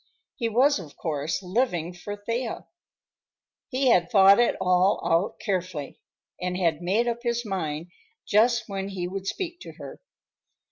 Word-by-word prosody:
He 230 -4 -1
was, 260 +4 +3
of 155 -6 -11
course, 155 +3 -2
living 180 -4 0
for 205 +4 -6
Thea. 230 +3 -4 1.0
He 260 0 +2
had 175 -6 +4
thought 195 0 +7
it 240 - +3
all 180 +1 +3
out 170 +5 +1
carefully 180 -8 -3 0.4
and 180 0 -2
had 165 -3 +1
made 200 +7 +1
up 235 0 -2
his 235 -1 -1
mind 170 -4 -3 0.3
just 235 +2 +3
when 195 -1 -4
he 180 -3 -3
would 195 +1 -5
speak 350 - -4
to - - -10
her. - - -10
195 Hz, 150 wpm, -26 LUFS, 175-235 Hz, 1.0 s, thought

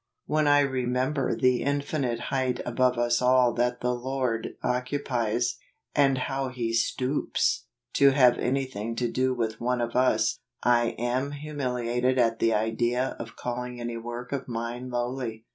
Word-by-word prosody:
When 155 0 +1
I 145 0 +6
remember 130 +1 0
the 125 -1 +2
infinite 140 -4 -1
height 130 -2 0
above 125 +1 +2
us 120 0 +2
all 125 -1 +4
that 125 0 0
the 125 0 +1
Lord 125 -2 -2
occupies, 125 -2 -1 0.3
and 135 -2 +3
how 135 +1 -2
He 120 -3 -3
stoops, 125 +4 0 0.3
to 140 - +6
have 130 -3 +5
anything 125 -4 -2
to 120 +1 0
do 130 0 +1
with 110 -2 -2
one 125 +1 0
of 120 -1 -2
us, 110 -4 +2 0.2
I 120 -1 +3
am 125 +4 -1
humiliated 130 -4 -1
at 115 -2 +2
the 115 - +3
idea 120 +4 0
of 115 0 -7
calling 125 0 -4
any 120 -1 -4
work 120 +1 -6
of 140 -2 -3
mine 120 +1 -4
lowly. 120 -2 -3
125 Hz, 150 wpm, -27 LUFS, 120-130 Hz, 0.3 s, I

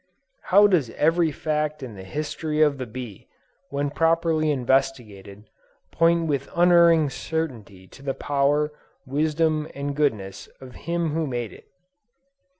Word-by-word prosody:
How 200 +3 +6
does 175 - +2
every 165 +1 +2
fact 150 0 -2
in 125 -4 -7
the 95 -2 -10
history 150 - -4
of 150 -3 +3
the 130 - -4
bee, 115 -3 -9 0.4
when 140 0 -2
properly 165 0 +1
investigated, 120 -7 -1 0.4
point 165 0 +2
with 140 -3 -2
unerring 170 -4 +5
certainty 120 - -5
to - - -15
the 135 -1 -3
power, 145 +1 +1 0.3
wisdom 155 +2 0
and 140 0 -4
goodness, 105 -10 -2
of 130 -1 -12 0.2
Him 170 -1 0
who 160 0 -1
made 120 -4 -4
it! - - -16
145 Hz, 135 wpm, -24 LUFS, 130-160 Hz, 0.4 s, How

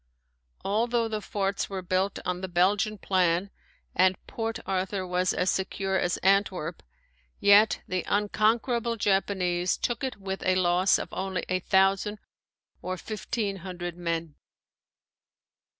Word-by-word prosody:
Although 230 +3 +1
the 215 -1 -3
forts 200 -1 -2
were 190 -2 -4
built 185 +2 0
on 180 0 -2
the 190 - -3
Belgian 195 +4 +2
plan 185 0 +1 0.4
and 185 0 +4
Port 225 0 -3
Arthur 190 0 -1
was 180 0 +1
as 185 - +1
secure 190 0 -2
as 175 -2 +1
Antwerp, 195 +2 +1 0.6
yet 205 +2 +5
the 185 0 -1
unconquerable 225 +3 +1
Japanese 185 -3 +1
took 240 +2 -2
it 260 -2 -3
with 195 -1 -5
a 185 - +2
loss 185 +1 +3
of - - -5
only 190 -1 -3
a 185 0 +1
thousand 195 +3 +2 0.6
or 185 0 -3
fifteen 210 0 -3
hundred 175 -2 -6
men. 165 -2 -3
190 Hz, 130 wpm, -27 LUFS, 185-205 Hz, 0.6 s, yet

